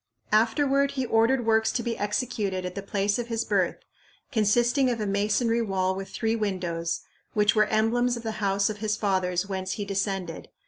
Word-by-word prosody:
"Afterward 275 Hz, +6 st, +3 dB
he 265 Hz, -2 st, -1 dB
ordered 230 Hz, +2 st, +2 dB
works 220 Hz, 0 st, +3 dB
to 240 Hz, -, -1 dB
be 235 Hz, -1 st, -2 dB
executed 205 Hz, -3 st, -2 dB
at 180 Hz, -, -4 dB
the 200 Hz, -, -5 dB
place 200 Hz, +2 st, 0 dB
of 240 Hz, -, -3 dB
his 230 Hz, -1 st, -2 dB
birth, 195 Hz, -4 st, +1 dB, 0.6 s
consisting 240 Hz, +3 st, +3 dB
of 240 Hz, -2 st, -1 dB
a 210 Hz, -, -1 dB
masonry 210 Hz, +4 st, +1 dB
wall 190 Hz, -3 st, 0 dB
with 195 Hz, 0 st, -6 dB
three 225 Hz, 0 st, -1 dB
windows, 175 Hz, -6 st, -2 dB, 0.3 s
which 210 Hz, -1 st, +3 dB
were 215 Hz, -1 st, +4 dB
emblems 235 Hz, +3 st, +1 dB
of 235 Hz, -, -8 dB
the 220 Hz, -1 st, -4 dB
house 195 Hz, 0 st, +2 dB
of 215 Hz, -, -3 dB
his 215 Hz, 0 st, -1 dB
fathers 185 Hz, -3 st, 0 dB
whence 190 Hz, -1 st, -3 dB
he 205 Hz, -, -4 dB
descended. 195 Hz, -3 st, -3 dB
210 Hz, 185 wpm, -26 LUFS, 195-230 Hz, 0.6 s, were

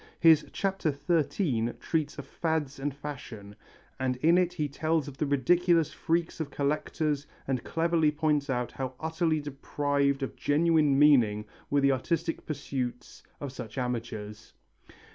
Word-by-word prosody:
His 160 Hz, -2 st, +6 dB
Chapter 195 Hz, -5 st, 0 dB, 0.2 s
XIII 145 Hz, -, +1 dB
treats 155 Hz, -3 st, -1 dB
of 145 Hz, -, -6 dB
fads 155 Hz, -2 st, -2 dB
and 145 Hz, +2 st, -1 dB
fashions, 130 Hz, -8 st, -8 dB, 0.5 s
and 130 Hz, -1 st, 0 dB
in 160 Hz, +7 st, +4 dB
it 180 Hz, -1 st, +2 dB
he 150 Hz, -4 st, -1 dB
tells 155 Hz, +2 st, 0 dB
of 140 Hz, -, -8 dB
the 150 Hz, -, 0 dB
ridiculous 165 Hz, +3 st, +3 dB
freaks 165 Hz, 0 st, -1 dB
of 155 Hz, -3 st, -3 dB
collectors 145 Hz, +1 st, -1 dB, 0.2 s
and 130 Hz, -3 st, -1 dB
cleverly 165 Hz, -1 st, +2 dB
points 150 Hz, -2 st, 0 dB
out 125 Hz, -2 st, -1 dB
how 130 Hz, -1 st, -5 dB
utterly 160 Hz, 0 st, 0 dB
deprived 140 Hz, -1 st, -1 dB
of 135 Hz, -, -4 dB
genuine 150 Hz, -2 st, +3 dB
meaning 120 Hz, -8 st, +5 dB, 0.2 s
were 145 Hz, 0 st, +2 dB
the 140 Hz, 0 st, +4 dB
artistic 165 Hz, +5 st, -1 dB
pursuits 130 Hz, -4 st, -4 dB, 0.2 s
of 140 Hz, -2 st, -5 dB
such 125 Hz, -2 st, -8 dB
amateurs. 115 Hz, -3 st, -4 dB
145 Hz, 145 wpm, -29 LUFS, 130-160 Hz, 0.5 s, His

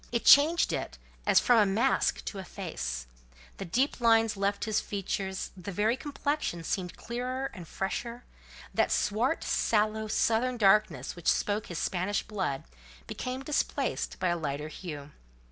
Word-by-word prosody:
It 235 Hz, -1 st, -1 dB
changed 310 Hz, +4 st, +6 dB
it -, -, -4 dB, 0.3 s
as -, -, +6 dB
from 245 Hz, -2 st, +4 dB
a 210 Hz, -, +5 dB
mask 225 Hz, +8 st, +1 dB
to 200 Hz, -, -5 dB
a -, -, -5 dB
face: 65 Hz, -, -5 dB, 0.5 s
the 195 Hz, -, -5 dB
deep 250 Hz, -, 0 dB
lines 225 Hz, -2 st, +4 dB
left 200 Hz, 0 st, -1 dB
his 220 Hz, -1 st, +1 dB
features; 195 Hz, -1 st, -3 dB
the 190 Hz, +1 st, -7 dB
very 210 Hz, +5 st, +1 dB
complexion 285 Hz, -, -2 dB
seemed 180 Hz, +1 st, -3 dB
clearer 255 Hz, +3 st, -3 dB
and 180 Hz, -5 st, -9 dB
fresher; 235 Hz, +7 st, -4 dB, 0.5 s
that -, -, +2 dB
swart, 235 Hz, +9 st, +1 dB
sallow, 215 Hz, 0 st, +1 dB
southern 235 Hz, +3 st, +1 dB
darkness 210 Hz, 0 st, +3 dB
which 175 Hz, -1 st, -8 dB
spoke 210 Hz, +1 st, -1 dB
his 175 Hz, -, -5 dB
Spanish 190 Hz, +4 st, -1 dB
blood, 190 Hz, -10 st, -3 dB, 0.4 s
became 255 Hz, +1 st, -5 dB
displaced 295 Hz, +1 st, -1 dB
by 185 Hz, -1 st, +1 dB
a 175 Hz, -, +1 dB
lighter 150 Hz, 0 st, -3 dB
hue. 150 Hz, -4 st, -8 dB
210 Hz, 150 wpm, -29 LUFS, 185-240 Hz, 0.5 s, changed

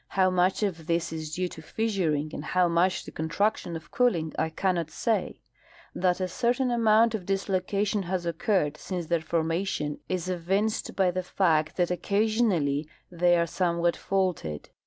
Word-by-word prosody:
How 185 Hz, -1 st, +4 dB
much 185 Hz, +3 st, +2 dB
of 165 Hz, -6 st, -2 dB
this 170 Hz, -1 st, 0 dB
is 155 Hz, -1 st, -5 dB
due 185 Hz, 0 st, 0 dB
to 160 Hz, -, -10 dB
fissuring 160 Hz, -6 st, -1 dB
and -, -, -5 dB
how 180 Hz, +2 st, +2 dB
much 175 Hz, +2 st, +2 dB
to -, -, -10 dB
contraction 175 Hz, +2 st, -1 dB
of 160 Hz, -, -9 dB
cooling 175 Hz, -11 st, +1 dB
I 160 Hz, -, 0 dB
cannot 175 Hz, 0 st, 0 dB
sa}^ 225 Hz, +6 st, -1 dB, 0.6 s
That 180 Hz, 0 st, +1 dB
a 185 Hz, -, 0 dB
certain 245 Hz, +6 st, 0 dB
amount 230 Hz, -1 st, +4 dB
of 200 Hz, -5 st, -4 dB
dislocation 195 Hz, +1 st, 0 dB
has 185 Hz, -2 st, -1 dB
occurred 165 Hz, -2 st, 0 dB
since 175 Hz, +2 st, -4 dB
their 170 Hz, 0 st, 0 dB
formation 165 Hz, -2 st, -1 dB
is 185 Hz, -2 st, -2 dB
evinced 190 Hz, +5 st, -1 dB
by 190 Hz, -2 st, +3 dB
the 185 Hz, +1 st, -2 dB
fact 160 Hz, -4 st, +1 dB
that 180 Hz, -1 st, +1 dB
occasionally 185 Hz, -7 st, +1 dB, 0.2 s
the}^ 175 Hz, 0 st, +4 dB
are 170 Hz, -, +2 dB
somewhat 170 Hz, -1 st, 0 dB
faulted. 180 Hz, -, -2 dB
180 Hz, 160 wpm, -27 LUFS, 165-195 Hz, 0.6 s, How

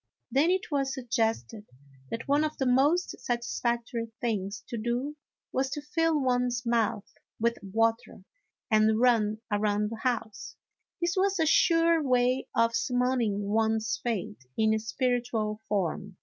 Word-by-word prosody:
Then 285 Hz, +6 st, +3 dB
it 370 Hz, -2 st, 0 dB
was 275 Hz, -2 st, 0 dB
suggested 225 Hz, -3 st, -2 dB, 0.4 s
that 230 Hz, -, -5 dB
one 285 Hz, +2 st, +3 dB
of 310 Hz, 0 st, -2 dB
the 265 Hz, -, 0 dB
most 285 Hz, +8 st, +3 dB
satis 235 Hz, -1 st, -3 dB
factory 235 Hz, -1 st, -2 dB
things 210 Hz, -3 st, -2 dB
to -, -, -4 dB
do 240 Hz, +6 st, -2 dB, 0.4 s
was 265 Hz, +1 st, 0 dB
to 295 Hz, -, -4 dB
fill 325 Hz, 0 st, +1 dB
one's 250 Hz, -2 st, 0 dB
mouth 225 Hz, -3 st, 0 dB, 0.3 s
with 235 Hz, +1 st, +1 dB
water 225 Hz, +4 st, -1 dB, 0.5 s
and 215 Hz, 0 st, +4 dB
run 220 Hz, -3 st, +3 dB
around 210 Hz, 0 st, +1 dB
the 225 Hz, -, -5 dB
house; 230 Hz, -5 st, -3 dB, 0.4 s
this 345 Hz, +2 st, 0 dB
was 390 Hz, 0 st, +1 dB
a 320 Hz, -, +3 dB
sure 330 Hz, +1 st, +4 dB
way 255 Hz, -1 st, +1 dB
of 230 Hz, 0 st, +3 dB
summoning 245 Hz, -5 st, 0 dB
one's 220 Hz, +1 st, +1 dB
fate 190 Hz, -, -3 dB
in 220 Hz, 0 st, +3 dB
spiritual 225 Hz, -1 st, -1 dB
form. 195 Hz, 0 st, -2 dB
235 Hz, 140 wpm, -28 LUFS, 220-265 Hz, 0.5 s, and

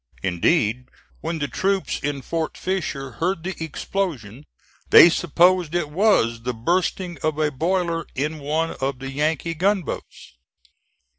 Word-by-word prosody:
Indeed 110 Hz, -, +1 dB, 0.3 s
when 165 Hz, +1 st, -3 dB
the 145 Hz, -2 st, -2 dB
troops 195 Hz, +5 st, -1 dB
in 140 Hz, -2 st, -3 dB
Fort 165 Hz, +2 st, -3 dB
Fisher 155 Hz, -8 st, -3 dB
heard 175 Hz, -1 st, 0 dB
the 190 Hz, +1 st, -3 dB
explosion 150 Hz, -, -4 dB, 0.4 s
they 170 Hz, -, +9 dB
supposed 175 Hz, +1 st, +2 dB
it 160 Hz, -4 st, -1 dB
was 150 Hz, -, +2 dB
the 125 Hz, +1 st, -3 dB
bursting 175 Hz, +5 st, -1 dB
of 155 Hz, -1 st, -1 dB
a 155 Hz, -1 st, +1 dB
boiler 170 Hz, +3 st, -1 dB
in 150 Hz, +4 st, -2 dB
one 155 Hz, +3 st, -1 dB
of 135 Hz, 0 st, -1 dB
the 135 Hz, +1 st, -6 dB
Yankee 155 Hz, +3 st, -1 dB
gunboats. 185 Hz, -, -2 dB
160 Hz, 135 wpm, -23 LUFS, 135-175 Hz, 0.4 s, they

